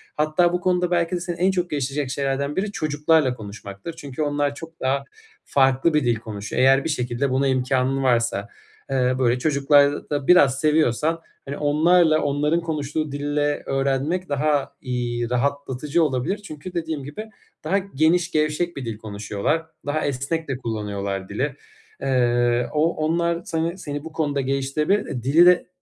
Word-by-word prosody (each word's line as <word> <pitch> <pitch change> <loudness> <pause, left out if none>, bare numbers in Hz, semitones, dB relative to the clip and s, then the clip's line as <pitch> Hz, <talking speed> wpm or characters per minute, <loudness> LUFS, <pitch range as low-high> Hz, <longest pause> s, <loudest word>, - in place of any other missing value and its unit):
Hatta 155 +3 +2
bu 180 - 0
konuda 180 0 +1
belki 175 0 +1
de - - -2
seni 175 0 -4
en 185 +3 +2
çok 180 -2 -1
geliştirecek 140 -1 -2
şeylerden 140 +1 -1
biri 200 +2 -1
çocuklarla 150 -4 +2
konuşmaktır. 100 +4 -8
Çünkü 140 -1 -6
onlar 145 -1 0
çok 165 +2 -11
daha 135 +1 0 0.4
farklı 135 +3 +3
bir 150 -1 +3
dil 120 -1 +3
konuşuyor. 110 -1 -4
Eğer 135 +1 +5
bir - - -2
şekilde 125 -1 -1
buna 135 +2 +1
imkânın 130 +1 +1
varsa. 115 -5 +1 0.4
Eee, 130 -1 +1
böyle 125 -1 +2
çocukları 145 0 +3
da 145 -2 -2
biraz 140 -7 +5
seviyorsan, 155 +1 +2 0.2
hani, 140 +1 -5
onlarla, 155 +2 +4
onların 150 +4 +1
konuştuğu 155 -2 -3
dille 145 +1 -1
öğrenmek 135 +7 -1
daha, 145 0 0
iii, 120 -2 -2
rahatlatıcı 140 +4 0
olabilir. 135 +6 0
Çünkü 180 -4 -9
dediğim 160 -4 -3
gibi 150 +11 -7 0.3
daha 195 - +1
geniş 175 -2 +1
gevşek 155 +2 0
bir 135 - -5
dil 115 -2 -4
konuşuyorlar. 105 +8 -2 0.2
Daha 145 +2 -1
esnek 145 +4 -2
de 135 -2 -2
kullanıyorlar 100 -5 -4
dili. 135 +7 -2 0.5
Iıı, 120 -2 +2
o 155 +3 +2
onlar 170 +2 0
seni 165 +2 -2
seni 145 -5 -5
bu 160 - -8
konuda 145 -3 0
geliştirebilir. 135 - -1
Dili 155 +7 +5
de 180 0 +5
145 Hz, 155 wpm, -23 LUFS, 130-160 Hz, 0.5 s, Eğer